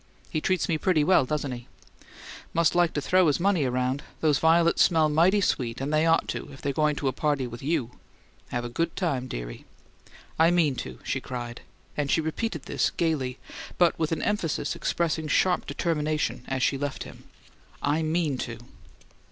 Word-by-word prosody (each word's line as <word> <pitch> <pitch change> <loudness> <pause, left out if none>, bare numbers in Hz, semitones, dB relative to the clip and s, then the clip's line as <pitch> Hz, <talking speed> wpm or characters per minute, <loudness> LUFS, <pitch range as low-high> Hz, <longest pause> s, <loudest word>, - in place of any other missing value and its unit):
"He 155 - -1
treats 185 +2 +1
me 160 -2 0
pretty 165 -5 +2
well, 160 -3 +4
doesn't 145 0 -2
he?" 120 -1 -7 0.9
"Must 170 -1 +3
like 175 -2 +3
to 145 - -1
throw 185 +4 +3
his 150 - +2
money 180 -5 +2
around! 125 +2 0 0.2
These 150 -3 +2
violets 165 +1 +4
smell 160 -3 +4
mighty 175 +7 +4
sweet, 125 -9 0
and 140 +3 -2
they 155 +2 +3
ought 165 0 +3
to, - - -4
if 135 - -12
they're 140 - -2
going 150 +1 +2
to 140 - -2
a - - +2
party 145 -1 0
with 120 -1 -8
YOU. 140 -5 -1 0.6
Have 120 0 -2
a - - -4
good 165 +7 -2
time, 140 -8 -1
dearie." - - -6 0.8
"I 165 +1 +6
mean 170 -5 +3
to!" 65 -1 -6
she - - -2
cried; 120 -1 -6 0.3
and 145 -2 -1
she - - +3
repeated 160 +1 -3
this - - 0
gaily, 140 -7 -1 0.4
but 175 -2 +4
with 160 -1 0
an 165 - -1
emphasis 205 -8 -1
expressing 160 -2 -1
sharp 180 +4 +2
determination 155 -2 -1
as 130 -1 -1
she 135 - +1
left 145 -1 -3
him. - - -13 0.6
"I 145 +3 +1
MEAN 155 -4 0
to!" 115 -2 -4
155 Hz, 185 wpm, -26 LUFS, 135-165 Hz, 0.9 s, I